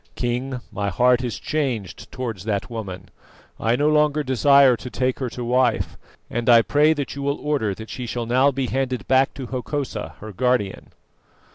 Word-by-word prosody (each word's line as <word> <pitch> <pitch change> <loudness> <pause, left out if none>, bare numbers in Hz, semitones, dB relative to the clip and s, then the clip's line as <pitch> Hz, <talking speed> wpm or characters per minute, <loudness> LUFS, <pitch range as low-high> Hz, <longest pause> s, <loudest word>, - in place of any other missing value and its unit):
King, 125 +1 -2
my 100 -1 -2
heart 125 +6 +3
is 120 -3 -3
changed 125 - -3
towards 115 -7 -5
that 105 +1 -2
woman; 95 -5 -6 0.5
I 115 +1 +2
no 145 +4 +1
longer 150 0 +3
desire 135 0 +5
to 125 - -8
take 130 +1 -1
her 130 -2 -2
to 125 - -6
wife, 125 -1 +1 0.3
and 120 +1 -2
I 115 -1 +7
pray 150 +5 +4
that 145 -3 -4
you 140 - -5
will 140 +1 -1
order 140 -10 -1
that 110 +2 -9
she 125 -2 -5
shall 120 0 -3
now 130 +4 +4
be 135 -1 -2
handed 130 -3 -2
back 130 +1 +3
to 135 - -6
Hokosa 130 -2 -4
her 110 +1 -8
guardian." 115 -2 0
125 Hz, 180 wpm, -22 LUFS, 115-135 Hz, 0.5 s, I